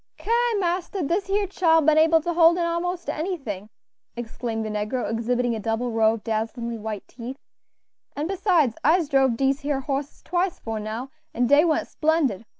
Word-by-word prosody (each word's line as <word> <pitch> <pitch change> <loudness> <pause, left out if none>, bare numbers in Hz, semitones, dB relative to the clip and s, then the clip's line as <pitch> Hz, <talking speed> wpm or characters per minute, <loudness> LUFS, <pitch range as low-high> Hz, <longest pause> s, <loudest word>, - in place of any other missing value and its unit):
"Ki! 445 - -5 0.3
marster, 360 0 -1
dis 350 +7 -1
here 400 +1 +1
chile 340 -4 +3
ben 310 0 +5
able 325 0 +5
to 345 +2 -2
hold 335 0 +5
in 350 - 0
a'most 340 +1 -2
anything," 290 - -4 0.5
exclaimed 230 -1 -4
the - - -3
negro, 210 +4 -2
exhibiting 235 +1 0
a - - -4
double 225 +3 -2
row 225 0 +3
of 215 - -11
dazzlingly 230 +1 -3
white 215 -1 -6
teeth; 250 +2 -8 0.8
"an' 295 - -2
besides, 345 - +1
I'se 325 +2 +3
drove 265 -4 +3
dese 270 +1 +1
here 285 -2 -2
hosses 275 0 -4
twice 360 +1 -1
'fore 225 -1 -5
now, 220 +5 -5 0.2
an' 245 - +2
dey 285 +5 +5
went 325 -3 +1
splendid. 300 - 0
275 Hz, 175 wpm, -24 LUFS, 230-335 Hz, 0.8 s, ben